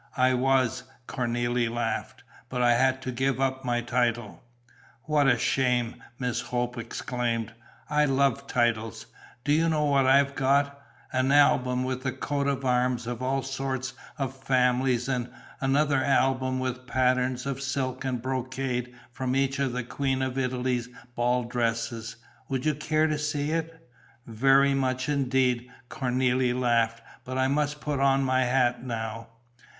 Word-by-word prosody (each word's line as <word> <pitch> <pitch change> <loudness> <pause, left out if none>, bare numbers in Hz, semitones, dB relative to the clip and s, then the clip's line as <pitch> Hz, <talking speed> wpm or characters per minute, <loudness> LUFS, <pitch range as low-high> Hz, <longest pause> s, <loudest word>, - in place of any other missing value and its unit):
"I 130 0 +4
was!" 130 -1 +2 0.3
Cornélie 120 -1 0
laughed. 120 +1 -3 0.3
"But 125 -1 -1
I 120 0 +5
had 130 +2 +2
to 130 - -3
give 130 +1 0
up 135 0 0
my 120 -1 0
title." 120 -2 -1 0.6
"What 150 -2 +2
a 125 -2 +4
shame!" 125 -1 0 0.2
Miss 125 -3 -1
Hope 125 0 -2
exclaimed. 115 -1 -3 0.3
"I 150 0 +3
love 140 0 +1
titles. 115 -4 0 0.4
Do 145 - +2
you 165 +2 +3
know 155 -2 +1
what 140 -2 +3
I've 140 +1 +4
got? 140 +1 +1 0.3
An 130 +1 +2
album 130 -3 +4
with 130 0 -3
the 130 0 -1
coats 140 +1 -2
of 140 -1 -2
arms 125 -1 +1
of 120 0 -4
all 135 +1 0
sorts 135 -1 -3 0.2
of 135 -2 -3
families 125 -1 +1
and 125 -2 -1 0.3
another 140 +1 +2
album 130 -1 +1
with 130 0 -4
patterns 125 0 +1
of 135 -1 -3
silk 135 -1 -2
and 125 -3 -2
brocade 130 -1 -3 0.2
from 130 +1 -2
each 135 0 +1
of 135 -2 +1
the 125 0 -3
Queen 135 +2 -1
of 130 -1 -2
Italy's 125 -2 -1 0.3
ball 125 +1 +1
dresses. 115 -1 -2 0.3
Would 130 0 -2
you 155 - +3
care 155 +1 +1
to 155 -1 0
see 150 0 -1
it?" 165 -1 -4 0.4
"Very 135 +4 +4
much 130 -1 0
indeed!" 130 -3 +1 0.2
Cornélie 125 -2 +1
laughed. 115 -2 +1 0.2
"But 130 +1 -5
I 130 0 +2
must 150 +1 0
put 145 -2 -2
on 135 0 +3
my 130 -1 +2
hat 125 -1 +1
now." 115 -2 -4
130 Hz, 155 wpm, -27 LUFS, 125-135 Hz, 0.6 s, I